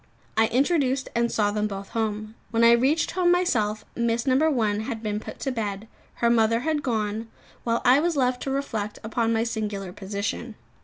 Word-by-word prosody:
I 225 0 +4
introduced 270 +1 +1
and 235 0 +1
saw 205 -1 +1
them 210 0 0
both 195 -1 -6
home. 215 -1 -2 0.2
When 230 0 +2
I 230 - +8
reached 265 +7 +3
home 355 -1 +2
myself, 215 -13 +1
Miss. 235 0 0
No. 275 +4 +3
1 215 -7 +1
had 225 0 -4
been 210 -1 -1
put - - -9
to 270 - -1
bed; 215 -3 -3 0.3
her 235 - +2
mother 230 0 +3
had 310 +1 0
gone, 220 -3 -2 0.4
while 230 0 0
I 255 +3 +6
was 335 0 0
left 250 -1 +1
to - - -3
reflect 225 -7 -2
upon 225 +1 0
my 225 0 +2
singular 210 -5 -3
position. 200 +4 -4
230 Hz, 190 wpm, -25 LUFS, 215-260 Hz, 0.4 s, I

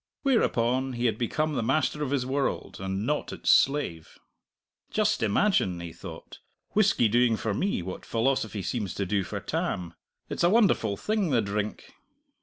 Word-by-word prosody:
Whereupon 130 - +2
he 120 0 -2
had 110 -3 +1
become 155 +6 0
the - - 0
master 150 +5 0
of 145 - -1
his 135 -2 0
world, 135 +1 -2
and 95 +2 -3
not 150 +2 -1
its - - +1
slave. 135 - +2 0.7
"Just 215 -5 +1
imagine," 105 - +2
he 85 -1 -7
thought, - - -10 0.3
"whisky 200 - +3
doing 120 +1 +3
for 110 -1 -2
me 185 - -1
what 90 +1 -6
philosophy 115 -4 -1
seems 100 +1 -3
to 100 - -1
do 100 +1 0
for - - -5
Tam. 90 -2 -3 0.3
It's - - -3
a 175 - +6
wonderful 195 - +3
thing 210 - 0
the 125 -5 +3
drink!" 105 0 -3
120 Hz, 165 wpm, -27 LUFS, 100-150 Hz, 0.7 s, a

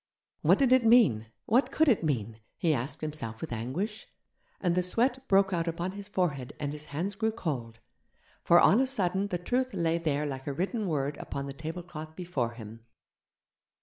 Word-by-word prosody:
What - - +5
did 265 -3 +4
it 260 -1 +5
mean? 220 - +5 0.2
What 255 +4 +2
could 315 +2 +3
it 230 -10 +3
mean? 115 -7 -2 0.2
he 165 -2 +2
asked 135 +3 -3
himself 150 -8 -2
with 160 - -6
anguish. 170 - -4 0.5
And 175 -3 +1
the 180 - +2
sweat 245 +8 +1
broke 195 0 +4
out 170 -1 0
upon 170 +2 -2
his 200 +1 -8
forehead 150 -10 -2
and 145 -1 -3
his 150 0 -4
hands 165 +8 -3
grew 220 +3 0
cold, 135 - -4 0.7
for 175 - +6
on 210 - +6
a 265 - +2
sudden 195 -5 +1
the 180 - -2
truth 250 +8 -1
lay 165 0 +1
there 150 -3 0
like 135 -1 -5
a 140 - -1
written 200 - -2
word 145 -3 -1
upon 140 0 -5
the 140 - -6
tablecloth 160 +1 -7
before 155 -10 -2
him. 115 -1 -11
170 Hz, 185 wpm, -29 LUFS, 140-200 Hz, 0.7 s, for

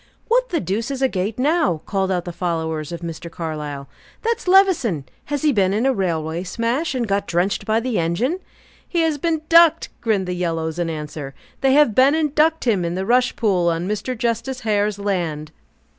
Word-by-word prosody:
"What - - +2
the 345 - 0
deuce 205 +7 -2
is 270 -1 -3
a - - +5
gate 200 -1 -3
now?" 255 - +1
called 195 -2 -1
out 180 -2 -1
the 175 - -4
followers 160 -3 -2
of 170 - -6
Mr. 170 0 -6
Carlyle. 150 -4 -5 0.4
"That's 465 -2 -1
Levison! 360 - +3 0.2
Has 290 -1 -3
he 300 -2 +3
been 195 -3 +2
in 225 +4 +1
a 270 - +3
railway 165 -5 -1
smash, 240 - -1
and 240 -3 -1
got 200 0 0
drenched 175 +3 0
by 220 +1 +2
the 245 -4 -1
engine?" 200 - 0 0.5
"He 340 - 0
has 320 -3 +1
been 320 0 -1
ducked!" 330 -1 +5
grinned 210 -5 +1
the 180 - -3
yellows, 165 -2 -2
in 170 -1 -1
answer. 150 -3 -6 0.2
"They 270 -1 +3
have 295 -6 +5
been 265 +6 +5
and 305 -3 0
ducked 320 0 +2
him 210 -7 +2
in 170 0 -2
the 190 +1 -2
rush 245 +3 +2
pool 185 -6 +2
on 170 +2 -1
Mr. 215 +5 -3
Justice 235 +3 -2
Hare's 210 -2 0
land." 170 -7 -2
205 Hz, 200 wpm, -21 LUFS, 170-270 Hz, 0.5 s, a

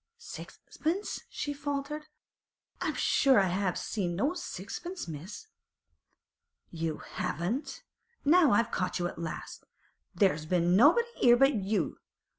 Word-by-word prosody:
'Sixpence!' 390 -4 -5
she 290 - -3
faltered, 285 +1 -4 0.7
'I'm - - -1
sure 265 -5 +4
I 190 -2 +2
haven't 185 0 0
seen 180 -5 -2
no 275 - +1
sixpence, 345 - -6
miss.' 170 - -8 1.3
'You 165 -2 -3
haven't? 185 - -3 0.4
Now, 315 -1 +6
I've 230 +3 +3
caught 185 - -1
you 175 - -1
at 170 - -8
last. 160 -2 -6 0.5
There's 160 -7 +2
been 175 0 +2
nobody 320 - +6
'ere 240 -1 +7
but 270 +2 +5
you. 200 -4 -1
220 Hz, 120 wpm, -30 LUFS, 175-290 Hz, 1.3 s, ere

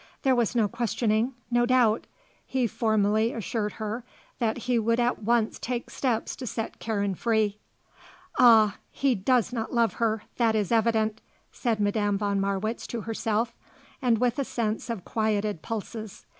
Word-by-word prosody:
There 265 - +4
was 240 -1 +1
no 225 -3 +3
questioning; 230 +1 0 0.2
no 240 0 +3
doubt. 240 -4 +3 0.4
He 260 -2 +1
formally 220 0 +1
assured 215 -1 -2
her 220 +2 -4 0.4
that 225 -1 0
he 245 -2 +2
would 230 +2 +1
at 240 -1 +1
once 225 0 +1
take 240 -1 -4
steps 240 -4 -1
to 255 - -6
set 225 0 -4
Karen 205 -3 -1
free. 215 0 0 0.8
"Ah, 220 -4 +7
he 275 -2 +1
does 240 +3 +1
not 230 0 -3
love 230 -1 +3
her, 220 -2 +1
that 230 -2 +3
is 210 -4 0
evident," 220 -1 +2 0.3
said 230 -4 -1
Madame 205 0 +1
von 200 -1 0
Marwitz 200 +3 -2
to 235 - -4
herself, 225 +1 -1 0.5
and 240 -4 +3
with 245 +2 +1
a - - +2
sense 225 -3 -2
of 225 -6 -4
quieted 210 -5 0
pulses. 220 -1 -6
225 Hz, 155 wpm, -27 LUFS, 215-240 Hz, 0.8 s, Ah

